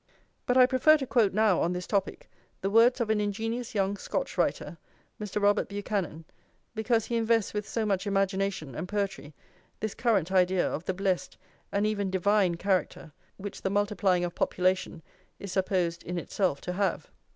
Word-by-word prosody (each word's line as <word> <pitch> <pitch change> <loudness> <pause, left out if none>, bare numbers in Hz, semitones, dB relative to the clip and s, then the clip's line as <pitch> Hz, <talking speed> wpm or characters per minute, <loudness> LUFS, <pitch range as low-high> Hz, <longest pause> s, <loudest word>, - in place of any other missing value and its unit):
But 250 - +3
I 255 - +8
prefer 265 +5 +5
to 275 - -4
quote 235 -6 +3
now, 210 -3 +3
on 175 - +1
this 180 0 -4
topic, 195 -2 -2 0.3
the 195 - -1
words 235 +4 +5
of 225 -2 0
an 210 -1 +1
ingenious 225 +4 -3
young 200 0 0
Scotch - - -3
writer, - - -1 0.4
Mr. 210 0 -3
Robert 205 0 +2
Buchanan, 200 -5 -3 0.5
because 225 0 +1
he 235 - -3
invests 225 -2 +1
with 210 0 -4
so 225 -2 -1
much 200 -1 -1
imagination 195 -6 -1
and 160 +8 -5
poetry 195 -8 -3 0.4
this 215 -1 -3
current 215 -7 +1
idea 185 -1 +3
of 160 - -4
the 190 - -2
blessed 190 -1 -1 0.3
and 200 +1 +1
even 205 -2 -1
divine 190 -1 +2
character 180 -3 -1 0.3
which 200 0 -7
the - - -1
multiplying 200 -3 +1
of 175 - -5
population 185 -3 0 0.3
is 200 - -7
supposed 180 -3 0
in 175 +1 -5
itself 175 -3 -1
to 180 - -4
have. 195 +1 -1
200 Hz, 175 wpm, -28 LUFS, 185-215 Hz, 0.5 s, I